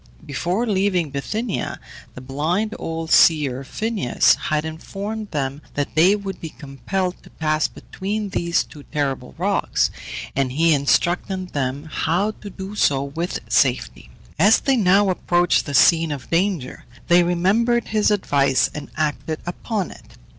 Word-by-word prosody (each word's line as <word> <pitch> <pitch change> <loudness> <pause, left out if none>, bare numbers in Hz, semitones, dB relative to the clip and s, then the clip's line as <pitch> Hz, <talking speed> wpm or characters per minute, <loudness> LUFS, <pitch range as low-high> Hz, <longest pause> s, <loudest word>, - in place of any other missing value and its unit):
Before 175 - -1
leaving 190 - +1
Bithynia, 210 - -3 0.4
the 125 - -8
blind 160 +11 -1
old 165 0 -4
seer, 140 -5 +4
Phineus, 215 - +2 0.2
had 155 0 0
informed 200 +7 -5
them 140 -1 -3
that 145 -1 -2
they 180 +6 +5
would 195 -3 -6
be 160 - -5
compelled 180 +7 -4
to - - -16
pass 155 -1 0
between 205 +2 -5
these 170 -2 0 0.3
terrible 135 - -2
rocks, - - +1 0.4
and 135 -2 0
he 165 +3 +4
instructed 175 +6 +1
them 135 -1 -2
how 175 +7 0
to 210 - -10
do 195 +1 -8
so 140 -9 +2
with 160 +6 -4
safety. 125 - +1 0.3
As 205 +6 +5
they 270 -1 +2
now 195 -2 +4
approached 175 -2 +1
the 140 - -2
scene 165 +2 +5
of 140 -3 -7
danger 170 -6 -1 0.2
they 175 +1 +6
remembered 200 +8 +1
his 215 -1 +2
advice, 140 -10 +2
and 150 - -7
acted 155 0 -2
upon 190 +2 -3
it. - - -16
170 Hz, 140 wpm, -22 LUFS, 145-195 Hz, 0.4 s, they